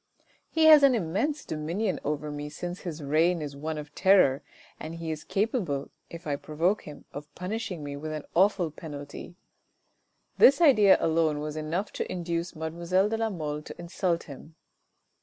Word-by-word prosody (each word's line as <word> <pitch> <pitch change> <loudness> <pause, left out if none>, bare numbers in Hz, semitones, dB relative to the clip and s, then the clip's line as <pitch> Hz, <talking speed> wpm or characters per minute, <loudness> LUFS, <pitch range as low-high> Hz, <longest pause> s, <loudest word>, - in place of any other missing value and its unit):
" - - -34
He 320 -1 +2
has 310 -2 +9
an 275 -3 +5
immense 225 - -1
dominion 170 +7 -2
over 150 +1 -3
me 145 0 -5
since 175 +4 -6
his 160 -4 -6
reign 165 +5 +2
is 145 -2 -6
one 155 +2 -4
of 150 0 -8
terror, 180 -9 +4 0.4
and 160 +2 -6
he 165 -1 -4
is 155 -1 -5
capable, 195 - -1 0.2
if 170 0 -10
I 145 -2 -1
provoke 165 +8 -1
him, 150 - -11
of 145 +1 -8
punishing 185 -3 -4
me 145 0 -5
with 155 +2 -6
an 155 -1 -5
awful 185 -2 +3
penalty." 145 +2 -9 1.0
This 280 +2 +7
idea 230 - +6
alone 160 -2 +1
was 150 0 -5
enough 160 +6 -3
to - - -4
induce 170 -1 -3
mademoiselle 170 +5 0
de 225 - -1
la 225 0 0
Mole 150 -6 -4
to - - -10
insult 170 0 -1
him. 155 +2 -12
165 Hz, 175 wpm, -27 LUFS, 150-190 Hz, 1.0 s, has